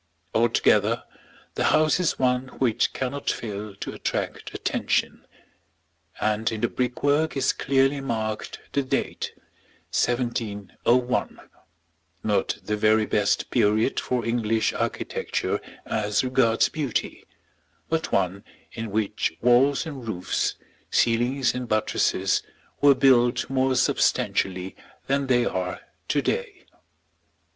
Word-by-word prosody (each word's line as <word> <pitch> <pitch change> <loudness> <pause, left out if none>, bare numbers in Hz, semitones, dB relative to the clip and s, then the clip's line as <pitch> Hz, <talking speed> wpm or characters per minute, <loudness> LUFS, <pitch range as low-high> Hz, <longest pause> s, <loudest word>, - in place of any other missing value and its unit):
Altogether 115 -1 +3 0.5
the - - 0
house 155 +2 +3
is 180 - +1
one 125 0 +1
which 120 -5 +1
cannot 135 +2 -3
fail 105 -2 -4
to - - -6
attract - - -3
attention; - - -1 0.9
and 110 +1 0
in 110 -1 -4
the 120 - +3
brickwork 145 +6 0
is 130 - +2
clearly 135 +1 +1
marked 110 -4 -3 0.2
the 140 - +2
date, 130 - -2 0.6
1701, 120 0 0 0.8
not 105 -2 0
the 105 - -1
very 110 +1 +3
best 105 -1 0
period 110 +1 +2
for 125 -2 -2
English 115 -1 +1
architecture - - -2 0.2
as 105 +1 0
regards 125 -3 +3
beauty, 145 -7 -3 0.6
but 160 0 -1
one 95 +1 0 0.3
in 115 -1 -5
which 105 0 -1
walls 125 +5 +4
and 135 -7 -7
roofs, 90 -5 -1 0.3
ceilings 120 +3 +2
and 125 -1 -4
buttresses, 105 -3 +1 0.4
were 140 -1 +7
built 125 -2 +4
more 130 0 +2
substantially 95 -6 +1 0.3
than 140 0 0
they 125 -2 +3
are 90 -3 -2 0.3
to - - +1
day. - - -3
120 Hz, 110 wpm, -25 LUFS, 110-130 Hz, 0.9 s, were